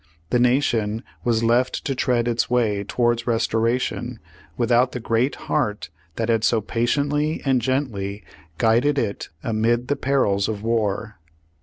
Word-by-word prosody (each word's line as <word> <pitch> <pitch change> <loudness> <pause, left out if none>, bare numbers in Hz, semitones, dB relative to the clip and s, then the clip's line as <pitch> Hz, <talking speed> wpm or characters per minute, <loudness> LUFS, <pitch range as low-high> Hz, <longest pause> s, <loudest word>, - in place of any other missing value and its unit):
The 125 - +3
Nation 120 -3 +1 0.2
was 115 -1 +1
left 120 +2 +1
to 135 - 0
tread 125 -2 +1
its 120 -1 0
way 110 -5 +1
towards 120 +2 0
restoration, 115 +1 0 0.4
without 120 +1 +2
the 125 - -3
Great 115 +4 0
Heart 105 - -1 0.2
that 115 - -1
had 115 -2 +1
so 115 - +3
patiently 145 +8 0
and 130 -2 +2
gently 110 -6 -2 0.3
guided 120 - +3
it 105 -6 -2
amid 115 +2 0
the 145 - +2
perils 105 -9 +1
of 105 -1 -4
war. 110 -2 -1
120 Hz, 140 wpm, -22 LUFS, 110-125 Hz, 0.4 s, The